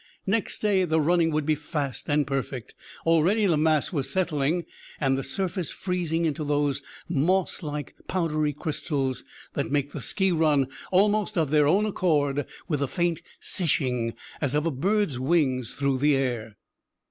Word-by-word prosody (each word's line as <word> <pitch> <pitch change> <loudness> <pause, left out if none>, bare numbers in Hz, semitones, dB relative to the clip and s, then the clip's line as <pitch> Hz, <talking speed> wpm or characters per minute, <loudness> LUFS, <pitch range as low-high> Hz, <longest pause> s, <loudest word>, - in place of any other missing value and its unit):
Next 210 +2 0
day 200 -3 +3
the 160 -2 +2
"running" 165 +2 +3
would 155 -2 0
be 155 - +3
fast 150 -3 -4
and 145 0 +3
perfect. 135 -3 -3 0.3
Already 170 +7 +4
the 175 -5 +3
mass 155 +2 +2
was 140 -5 -1
settling, 165 -2 0 0.3
and 135 -3 +2
the 135 - -2
surface 185 -3 -2
freezing 170 -3 -1
into 155 0 -1
those 145 -1 0 0.3
moss 175 +4 +1
like, 150 -3 -5
powdery 155 -4 0
crystals 145 -3 -2 0.3
that - - -2
make 145 0 0
the 145 - -6
ski 190 +7 +1
run 150 -5 +3 0.2
almost 205 +2 +3
of 155 -4 +1
their 150 -2 +4
own 195 +8 +4
accord 145 -8 +1 0.2
with 150 -5 0
the 140 - 0
faint 170 +2 0 0.2
"sishing" 125 - 0 0.3
as 140 -1 0
of 150 +1 +1
a 165 - +1
bird's 180 0 0
wings 130 -4 +1
through 140 -2 0
the 145 +1 +4
air. 120 -6 -2
150 Hz, 160 wpm, -26 LUFS, 140-175 Hz, 0.3 s, Already